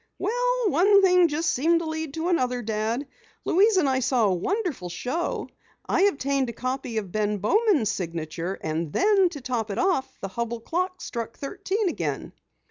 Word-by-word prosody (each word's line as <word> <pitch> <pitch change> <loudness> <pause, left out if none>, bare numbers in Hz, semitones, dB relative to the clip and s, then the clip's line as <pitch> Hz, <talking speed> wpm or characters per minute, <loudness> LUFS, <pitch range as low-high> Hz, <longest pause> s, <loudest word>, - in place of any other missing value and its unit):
"Well, - - 0
one 395 +5 +5
thing 360 -2 +6
just 310 +1 0
seemed 330 +6 +3
to - - -4
lead 315 -2 -4
to 325 +2 -1
another, 250 -8 0
Dad. 220 +5 -1 0.4
Louise 405 +3 +4
and 315 - +3
I 260 -1 +2
saw 255 -3 +2
a 195 - +3
wonderful 300 - -2
show, 260 - -3 0.4
I 385 - +3
obtained 275 -8 +1
a - - -5
copy 255 -2 -3
of 200 -4 -3
Ben 210 0 0
Bowman's 325 - +2
signature, 170 +1 -4
and 155 0 -2
then 390 - +4
to 295 -5 -8
top 240 -3 -2
it 200 - -4
off, 360 -9 +1
the 195 - -5
Hubell 235 +2 -4
clock 365 +7 -2
struck 230 -1 -5
thirteen 390 +7 -2
again!" 345 - -3
275 Hz, 175 wpm, -25 LUFS, 220-365 Hz, 0.4 s, thing